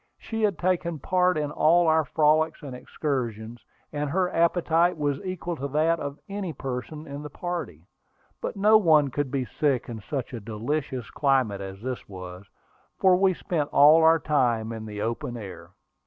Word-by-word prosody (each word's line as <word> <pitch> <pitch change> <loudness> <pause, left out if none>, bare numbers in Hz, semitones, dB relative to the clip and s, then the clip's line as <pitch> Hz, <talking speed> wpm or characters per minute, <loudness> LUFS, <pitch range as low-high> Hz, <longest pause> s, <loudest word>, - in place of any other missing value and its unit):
She 225 -1 -5
had 205 -5 +1
taken 175 -2 0
part 180 +3 +1
in 150 -1 -2
all 170 +3 +4
our 160 0 +4
frolics 155 +2 +1
and 135 -3 -7
excursions, 120 -5 -4 0.3
and 145 -1 -2
her 180 +3 0
appetite 170 0 +2
was 145 -2 -1
equal 180 -2 -4
to 140 - -3
that 155 +4 +1
of 140 0 -5
any 195 -4 -4
person 135 +3 -6
in 145 -1 -7
the 150 - -7
party. 155 - -5 0.6
But - - -4
no 210 +2 +6
one 155 -8 +4
could 145 +1 -2
be 130 -1 -2
sick 135 +1 -1
in 110 -2 -6
such 130 +3 -5
a 120 - -4
delicious 120 +4 -4
climate 130 -8 +1
as 95 +1 -8
this 130 -4 -5
was, 90 0 -9 0.5
for 185 -1 +5
we 190 0 +3
spent 155 -5 -2
all 150 +3 +7
our 160 0 +6
time 120 -8 0
in 110 -1 -6
the 105 -1 -5
open 120 +1 -3
air. 100 -5 -9
145 Hz, 175 wpm, -26 LUFS, 120-165 Hz, 0.6 s, all